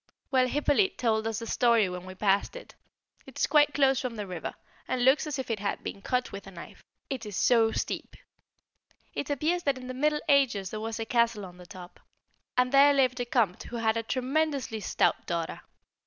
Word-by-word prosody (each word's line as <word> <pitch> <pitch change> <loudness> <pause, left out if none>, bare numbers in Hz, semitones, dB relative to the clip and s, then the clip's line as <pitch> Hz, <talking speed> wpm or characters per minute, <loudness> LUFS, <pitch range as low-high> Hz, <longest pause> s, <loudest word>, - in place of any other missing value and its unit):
Well, 255 -2 +3
Hippolyte 295 +7 +1
told 220 -2 +1
us 225 -2 -2
the 230 - -5
story 230 -3 +3
when 180 0 -7
we 185 - -9
passed 200 - +1
it. - - -10 0.5
It - - -12
is - - +2
quite 295 -1 +3
close 270 -2 +3
from 250 -3 -4
the 210 -2 -4
river, 180 -3 -6 0.3
and 245 -1 0
looks 270 +4 +4
as 295 -1 -3
if 260 -3 -4
it 220 - -2
had 200 0 -3
been 200 - -6
cut 250 +4 -1
with 200 0 -8
a - - -9
knife, 170 -2 -12 0.2
it 265 -4 -4
is 210 -3 -6
so 225 -2 +4
steep. - - -4 1.0
It 285 - -4
appears 310 +5 0
that 280 -5 0
in 255 - -9
the 255 - -5
Middle 300 +3 +1
Ages 255 -10 +2
there 215 - -5
was 225 0 -4
a 225 - -2
castle 235 -3 +1
on 180 -1 -12
the 180 -1 -13
top, 180 -1 -12 0.6
and 250 0 +3
there 280 +1 +6
lived 255 -2 +2
a 245 - -1
Comte 230 -7 +1
who 240 - -8
had 225 -1 +1
a 230 - 0
tremendously 265 0 -1
stout 200 - 0
daughter. 170 -1 -3
240 Hz, 215 wpm, -28 LUFS, 210-270 Hz, 1.0 s, there